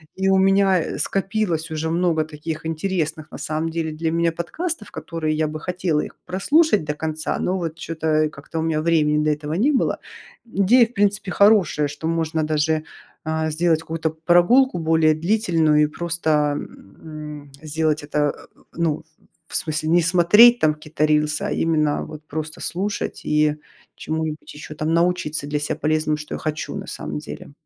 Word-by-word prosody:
И 190 0 +1
у 190 - +4
меня, 195 -1 +4
э, - - -4
скопилось 195 -4 -1
уже 160 0 -2
много 165 -2 +1
таких 155 +1 -6
интересных 160 -2 -2
на - - -7
самом 155 +1 -2
деле 160 -1 -2
для 160 +1 -2
меня 170 0 +1
подкастов, 260 - -4
которые 155 -2 -3
я 155 0 +1
бы 155 +1 -5
хотела 180 -2 -1
их - - -8
прослушать 285 - +2
до 150 0 -2
конца. 155 0 -3
Но 185 +1 0
вот 165 -3 -3
чё-то, 160 -1 -5 0.2
э, - - -2
как-то 155 +2 -7
у - - 0
меня 160 -1 0
времени 150 -2 +2
для 155 0 +2
этого 150 +1 -5
не 225 - +2
было. 265 - +1 0.7
Идея 245 -2 +7
в 240 - -23
принципе 205 -2 0
хорошая, 200 -8 +4
что 145 +3 -5
можно 160 -1 0
даже, 155 0 0 0.4
а, 160 0 -1
сделать 160 0 +2
какую-то 160 0 -2
прогулку 175 +10 +3
более 160 -1 +3
длительную 165 -3 +2
и - - +5
просто, 170 +1 -3 0.3
м, 150 +5 -10
сделать 155 0 -1
это, 145 0 -4 0.4
э, - - -23
ну, 160 -2 -1 0.4
в - - -9
смысле 155 0 -1
не 175 +2 +5
смотреть 190 +8 +6
там 155 -1 +3
какие-то 155 0 -2
рилсы. 150 0 +1
А - - -2
именно 155 -2 +1
вот 155 0 -10
просто 155 +1 -6
слушать 200 +4 -3
и 150 0 +2 0.4
чему-нибудь 155 -1 -4
еще 150 +1 -9
там 155 +2 -1
научиться 170 -3 0
для 150 0 -1
себя 145 - -2
полезному, 155 0 +1
что 150 0 -6
я - - -6
хочу 155 0 -4
на - - -6
самом 75 0 -5
деле. 75 - -9
160 Hz, 175 wpm, -22 LUFS, 155-175 Hz, 0.7 s, Идея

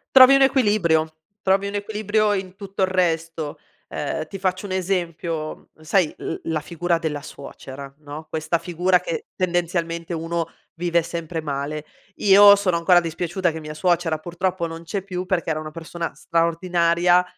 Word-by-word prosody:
Trovi 260 +1 +10
un 275 - +4
equilibrio, 200 - +3 0.3
trovi 195 +1 +2
un 200 - -5
equilibrio 210 0 0
in 190 -2 -4
tutto 195 -1 -6
il 190 - +4
resto. 165 -4 -1 0.3
Ehm, 155 +2 -3
ti 195 - -7
faccio 185 +1 -1
un 200 - -6
esempio: 170 -4 -3
sai 165 +1 +2
l - - -4
la 160 -1 0
figura 170 +2 -1
della 155 -3 -3
suocera, 140 0 -10
no, 150 +1 -9
questa 160 +1 0
figura 180 +2 +1
che 475 -3 -4
tendenzialmente 170 -2 -1
uno 165 0 -2 0.3
vive 170 0 +1
sempre 165 0 -4
male. 150 +1 -4 0.3
Io 200 0 +8
sono 190 -4 +1
ancora 175 +1 +5
dispiaciuta 175 +2 -1
che 160 - -6
mia 150 -1 -7
suocera, 170 0 +1
purtroppo, 175 +2 -2
non 165 0 -7
c'è 190 +3 -4
più 185 -2 -4
perché 180 -3 -1
era 155 - -1
una 155 0 -7
persona 165 +1 -5
straordinaria. 170 +1 +2
170 Hz, 160 wpm, -23 LUFS, 160-185 Hz, 0.3 s, Trovi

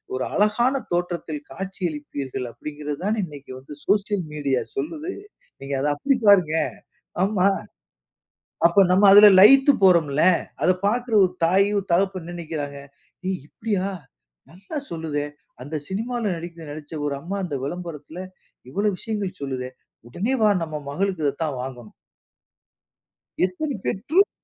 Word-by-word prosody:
ஒரு 130 - -1
அழகான 215 +6 +2 0.2
தோற்றத்தில் 170 -4 -2
காட்சி 190 +6 -7
அளிப்பீர்கள்! 140 -4 -5
அப்பிடிங்கிறதுதானே 150 - -4
இன்னக்கி 145 -5 -11
வந்து 135 +3 -11
சோசியல் 205 -2 +1
மீடியா 140 -4 0
சொல்லுது. 305 - -4 0.5
நீங்க 135 +1 -5
அத 145 - +1
அப்பிடி 275 - +1
பாருங்க, 175 -6 +5 0.7
ஆமா. 195 -2 +2 1.2
அப்போ 170 +4 +4
நம்ம 195 +3 +4
அதில 205 +1 +10
லயித்து 270 +7 +8
போறோம்ல. 160 -5 +4 0.4
அத 185 - +4 0.2
பார்க்கிற 240 +2 0
ஒரு 180 - 0
தாயும், 195 +4 +3
தகப்பன் 190 +1 +1
என்ன 175 +1 -7
நினைக்கிறாங்க, 150 -4 -5 0.5
"ஏய்! 190 -1 -1
இப்பிடியா! 200 -3 -2 0.6
நல்லா 195 - -10
சொல்லுதே! 160 -3 -3 0.4
அந்த 145 +4 -5
சினிமால 235 +5 -3
நடிக்க 170 +1 -8
நடிச்ச 150 +1 -9
ஒரு 145 - -1
அம்மா 185 +6 -4
அந்த 155 -6 -3
விளம்பரத்தில 170 0 -6 0.5
இவள 200 +10 -2
விஷயங்கள் 205 -4 -4
சொல்லுதே! 130 -2 -4 0.4
உடனே 210 - -1
வா! 215 - +6
நம்ம 155 -2 -6
மகளுக்கு 185 +1 -1
இத 140 - +1
தான் 140 -5 -3
வாங்கணும்." 125 -4 -8 1.5
எத்தனை 245 +10 -3
பெற்றோர் 315 - +2
175 Hz, 130 wpm, -23 LUFS, 150-205 Hz, 1.5 s, அதில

